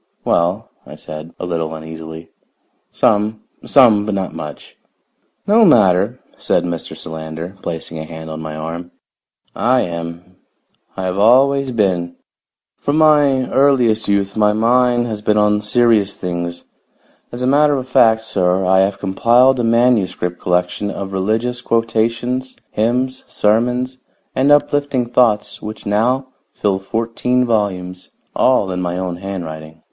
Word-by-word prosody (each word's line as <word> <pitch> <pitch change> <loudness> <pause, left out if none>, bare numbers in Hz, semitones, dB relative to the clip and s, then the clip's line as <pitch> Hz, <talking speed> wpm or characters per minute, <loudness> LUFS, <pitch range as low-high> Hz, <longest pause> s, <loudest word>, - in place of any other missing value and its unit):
"Well," 90 +7 0
I - - -12
said, 75 +2 -9
a - - -4
little 80 -2 -3
uneasily, 80 +1 -9 0.6
"some. 105 +1 +1 0.2
Some, 115 -7 +5
but 105 -1 -2
not 95 -1 -3
much." 75 -1 -9 0.7
"No 220 +3 +5
matter," 100 - +4 0.2
said - - +1
Mr. 85 -2 -5
Solander, 80 +3 -7
placing 80 -1 -5
a - - -5
hand 80 0 -9
on 80 0 -6
my 80 -1 -6
arm. 85 +3 -6 0.7
"I 125 +2 +2
am. 85 +1 -6 0.6
I 95 - -3
have 95 +1 -2
always 135 +5 +4
been. 90 -7 -1 0.6
From 145 +2 -1
my 145 -4 +4
earliest 125 -5 +2
youth 100 -1 0
my 105 -1 +3
mind 120 +2 +2
has 110 -3 -5
been 105 0 +1
on 105 0 +2
serious 105 -2 +2
things. 85 -1 -5 0.7
As 120 +1 -5
a - - +1
matter 145 +2 +3
of 130 -1 -4
fact, 110 -3 +4
sir, 95 -3 0
I 95 +1 +4
have 95 +1 +1
compiled 120 +7 +3
a - - 0
manuscript 115 -7 +1
collection 90 +3 -1
of 100 -1 -6
religious 110 +6 -1
quotations, 115 +2 -1
hymns, 125 +4 -1
sermons 125 +4 0 0.4
and 135 +2 +2
uplifting 145 -3 +2
thoughts 115 -4 +1
which 110 +1 -8
now 125 +6 0 0.2
fill 100 -2 -1
fourteen 115 +5 -1
volumes, 95 -5 -2 0.3
all 125 -7 +2
in 90 0 -3
my 90 0 -2
own 90 -2 -3
handwriting. 80 -5 -7
105 Hz, 140 wpm, -17 LUFS, 90-125 Hz, 0.7 s, Some